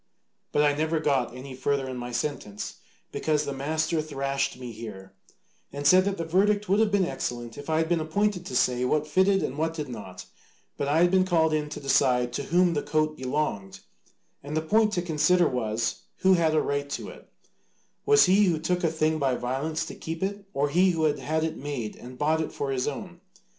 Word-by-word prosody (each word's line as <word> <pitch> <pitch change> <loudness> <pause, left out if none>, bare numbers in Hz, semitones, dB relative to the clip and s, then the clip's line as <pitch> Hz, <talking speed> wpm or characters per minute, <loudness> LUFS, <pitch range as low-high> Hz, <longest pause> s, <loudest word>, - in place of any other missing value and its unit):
But 150 - +3
I 145 -1 +4
never 160 +2 0
got 135 -5 0
any 130 +1 -8
further 135 +1 -1
in 130 - -5
my 125 0 -5
sentence, 120 -5 -4 0.3
because 150 -1 0
the 140 - -3
master 155 +4 -1
thrashed 140 -3 -2
me 125 -2 -7
here, 105 -4 -9 0.6
and 145 0 -6
said 185 +5 +6
that 200 0 -1
the 165 - -3
verdict 205 +5 +2
would 195 +3 +3
have 220 -2 +3
been 200 -2 +3
excellent 120 -7 -4
if 145 +2 -9
I 160 - +2
had 160 0 +1
been 170 0 +1
appointed 180 +4 0
to - - -5
say 125 0 +2
what 150 +4 +1
fitted 190 +5 +2
and 140 +3 -3
what 160 +1 -1
did 150 -4 -4
not, 95 -6 -8 0.5
but 140 - -2
I 155 +3 +3
had 175 - +3
been 190 -1 +4
called 165 -4 +2
in 150 -1 -1
to 150 - -6
decide 125 -3 +2
to 140 - -3
whom 175 +2 +3
the 145 - 0
coat 155 0 0
belonged, 130 -8 -3 0.6
and 145 +2 -4
the 155 - 0
point 215 +6 +3
to 175 - 0
consider 175 +1 +3
was, 115 -2 -2 0.2
who 190 0 +5
had 165 -3 +2
a 155 - +4
right 140 0 -2
to - - -5
it: - - -14 0.7
Was 430 0 +6
he 200 +3 +5
who 175 -4 +2
took 180 +3 -1
a 165 - +3
thing 155 0 0
by 135 -3 +1
violence 135 +6 -2
to - - -7
keep 165 +2 -5
it, 200 +1 -3
or 145 -4 0
he 180 +5 +4
who 160 -1 -1
had 150 -2 +1
had 160 +1 -1
it 160 -1 -2
made 135 -6 -4
and 125 +1 -11
bought 155 +3 +1
it 160 - -3
for 140 -1 -3
his 130 -1 -1
own? - - -6
155 Hz, 220 wpm, -26 LUFS, 135-170 Hz, 0.7 s, said